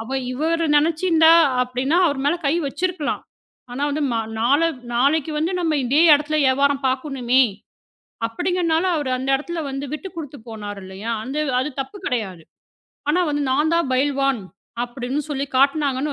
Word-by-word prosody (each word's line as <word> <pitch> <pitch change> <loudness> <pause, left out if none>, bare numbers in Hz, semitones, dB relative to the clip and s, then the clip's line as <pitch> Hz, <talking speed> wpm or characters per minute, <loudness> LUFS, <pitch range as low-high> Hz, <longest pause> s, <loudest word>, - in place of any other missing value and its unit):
அவ 265 +4 -3
இவரு 325 +4 0
நினைச்சு 320 +4 +1
இருந்தா 325 -1 +6 0.3
அப்படின்னா, 255 +7 0
அவர் 285 -3 -1
மேல 320 +4 +2
கை 290 - +2
வச்சிருக்கலாம். 315 +1 -2 0.5
ஆனா 275 +3 -4
வந்து 300 +2 -2
ம - - -1 0.3
நாளை 285 +8 +3 0.3
நாளைக்கு 285 +5 +2
வந்து 325 +4 0
நம்ம 320 -3 0
இதே 280 +6 +3
இடத்துல 300 +1 0
வியாபாரம் 275 +1 +2
பாக்கணும்மே, 260 -1 +1 0.8
அப்படிங்கிறதுனால, 345 +5 0
அவர் 285 -4 -2
அந்த 265 +1 -2
இடத்துல 330 +4 -5
வந்து 275 +1 -4
விட்டுக் 345 +2 -8
கொடுத்துப் 285 -6 -8
போனாரு 205 -2 -7
இல்லையா? 195 +5 -6
அந்த 270 +3 -4 0.2
அது 300 +3 -2
தப்பு 270 +9 -6
கிடையாது. 195 -9 -3 0.7
ஆனா 360 +4 +2
வந்து 290 0 -1
நான் 300 +4 +1
தான் 335 -6 +1
பயில்வான் 275 -2 +1 0.4
அப்படின்னு 250 +3 -4
சொல்லிப் 275 -1 -4
காட்டுனாங்கன்னு 280 0 +2
280 Hz, 155 wpm, -21 LUFS, 260-315 Hz, 0.8 s, இருந்தா